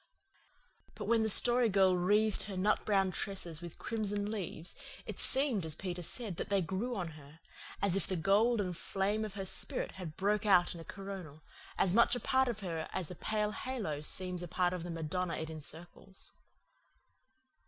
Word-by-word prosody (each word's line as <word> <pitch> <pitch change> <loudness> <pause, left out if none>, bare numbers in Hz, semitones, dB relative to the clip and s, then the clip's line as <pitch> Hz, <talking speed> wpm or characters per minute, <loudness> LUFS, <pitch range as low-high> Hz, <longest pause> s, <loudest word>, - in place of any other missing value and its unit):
But - - -5
when 230 -1 +3
the 220 - +2
Story 240 +2 +6
Girl 190 -2 +4
wreathed 205 +4 +2
her 195 -2 -6
nut 205 +3 +2
brown 195 -3 +2
tresses 175 -4 -1
with 170 -2 -8
crimson 205 -2 -1
leaves 180 -5 -4 0.3
it - - -6
seemed, 265 - +3
as 160 -2 -1
Peter 180 0 -4
said, 200 +1 -4
that - - -4
they 200 -1 +3
grew 195 +8 -2
on 180 -5 -3
her 150 0 -14 0.4
as 195 -2 +3
if 195 - 0
the 190 - -1
gold 205 +7 +3
and 180 -3 -1
flame 200 +5 -1
of 210 -2 -5
her 195 -1 -4
spirit - - -2
had 170 -5 -7
broken 205 +2 +1
out 180 -2 +5
in 170 - -8
a - - -8
coronal, 185 -6 -8 0.3
as 180 - +3
much 235 +3 +5
a - - -2
part 265 +1 +2
of 225 -3 -3
her 165 -4 -4
as 175 - -3
the 180 - -7
pale 210 +3 -1
halo 210 - -3
seems 180 +3 0
a 175 - -4
part 180 +1 +1
of 180 - -3
the 175 - -6
Madonna 165 +2 -2
it 160 0 -4
encircles. 165 +5 -9
190 Hz, 190 wpm, -33 LUFS, 175-210 Hz, 0.4 s, Story